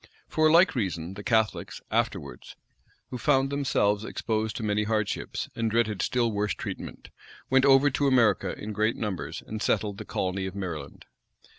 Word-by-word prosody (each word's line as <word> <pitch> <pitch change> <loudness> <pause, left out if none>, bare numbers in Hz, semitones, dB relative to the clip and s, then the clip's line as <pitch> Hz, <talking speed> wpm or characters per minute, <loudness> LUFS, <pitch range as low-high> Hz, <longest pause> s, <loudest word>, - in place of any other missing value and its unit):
[] - - -33
For 155 0 +5
a - - +4
like 170 +1 +6
reason, 95 -7 -2
the 105 - -8
Catholics, 110 -1 0
afterwards, 60 - -2 0.6
who 125 - -4
found 135 -1 +2
themselves 110 -7 +1
exposed 110 -1 -2
to - - -4
many 105 0 +1
hardships, 110 -2 -2
and 115 -1 0
dreaded 110 -3 +1
still 120 -2 +1
worse 105 0 -1
treatment - - -7 0.4
went 135 +1 +5
over 140 +1 +6
to 140 +2 +1
America 115 -7 +3
in 105 +1 -6
great 110 +2 +1
numbers, 105 -5 -4
and 110 0 -6
settled 105 -2 0
the - - -7
colony 95 +1 -2
of 95 - -7
Maryland. 80 -8 -6
110 Hz, 170 wpm, -27 LUFS, 100-130 Hz, 0.6 s, like